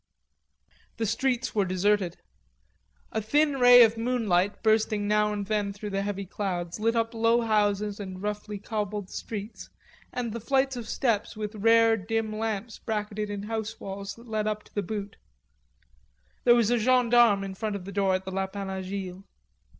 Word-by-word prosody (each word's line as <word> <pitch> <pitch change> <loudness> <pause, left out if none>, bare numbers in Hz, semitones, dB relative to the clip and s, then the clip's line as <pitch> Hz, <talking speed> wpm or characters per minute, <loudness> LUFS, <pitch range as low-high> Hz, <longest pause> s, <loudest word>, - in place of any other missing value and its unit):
The 225 - -1
streets 250 +3 0
were 205 - +2
deserted. 185 -1 +1 0.9
A 220 - -1
thin 285 +5 +2
ray 245 0 +9
of 225 0 +3
moonlight, 215 -6 0
bursting 215 -1 +2
now 210 0 +2
and 205 -1 -3
then 205 -1 -1
through 205 +1 -7
the 195 0 -1
heavy 200 -1 -3
clouds, 180 -2 -4
lit 230 +2 +1
up 230 0 0
low 230 +1 +3
houses 210 -2 +1
and 190 -2 -6
roughly 210 +1 -4
cobbled 205 -1 -4
streets 210 0 -6 0.4
and 240 -2 -3
the 235 - -4
flights 270 +3 +1
of 235 -2 -6
steps 225 -3 0
with 210 0 -4
rare 225 +1 +4
dim 220 +2 -2
lamps 220 0 -3
bracketed 210 -1 -3
in 205 -1 -4
house 220 0 -4
walls 195 0 -6
that 235 +1 -15
led 215 -1 -1
up 210 0 -2
to - - -23
the 205 - 0
Butte. 205 +1 -5 1.3
There 240 -1 +7
was 235 -1 +3
a 240 - +3
gendarme 240 -3 +4
in 195 -1 -5
front 210 +2 -3
of 190 -2 -6
the 200 - -7
door 195 -2 +2
of 185 0 -4
the 190 - -5
Lapin 195 +1 -3
Agile. 190 0 -5
210 Hz, 175 wpm, -27 LUFS, 200-225 Hz, 1.3 s, ray